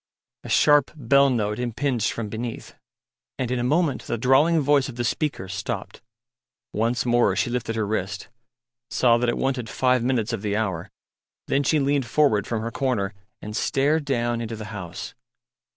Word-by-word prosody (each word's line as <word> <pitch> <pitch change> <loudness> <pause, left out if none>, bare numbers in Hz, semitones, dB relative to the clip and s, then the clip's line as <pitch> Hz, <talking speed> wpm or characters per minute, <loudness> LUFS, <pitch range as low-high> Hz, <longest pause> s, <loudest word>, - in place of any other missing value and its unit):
A - - -8
sharp 145 -2 +5
bell 140 0 +4
note 105 -4 -1
impinged 125 0 -1
from 115 -2 -4
beneath, 115 +2 -6 0.6
and 125 -2 -2
in 125 - 0
a - - -1
moment 150 +1 +1
the 120 - -1
drawling 135 +8 +4
voice 145 -1 +2
of 125 - -8
the 120 - -2
speaker 120 -3 -2
stopped. 95 +2 -5 0.7
Once 115 +4 0
more 120 -5 +3
she 120 - 0
lifted 120 -2 -2
her 110 -1 0
wrist, 100 -2 -3 0.6
saw 120 -2 +3
that 120 0 +1
it 120 - -1
wanted 130 -4 -1
five 125 +2 +2
minutes 120 -3 0
of 115 - -3
the 105 -1 -1
hour; 95 -7 -2 0.6
then 140 - +1
she 150 +2 +2
leaned 140 -2 +1
forward 115 -7 +2
from 110 -2 -2
her 115 - -3
corner 115 -7 -1 0.3
and 105 0 -6
stared 145 +6 +1
down 120 -4 -1
into 115 0 -4
the 110 -1 -7
House. 95 -5 -7
120 Hz, 175 wpm, -24 LUFS, 110-135 Hz, 0.7 s, sharp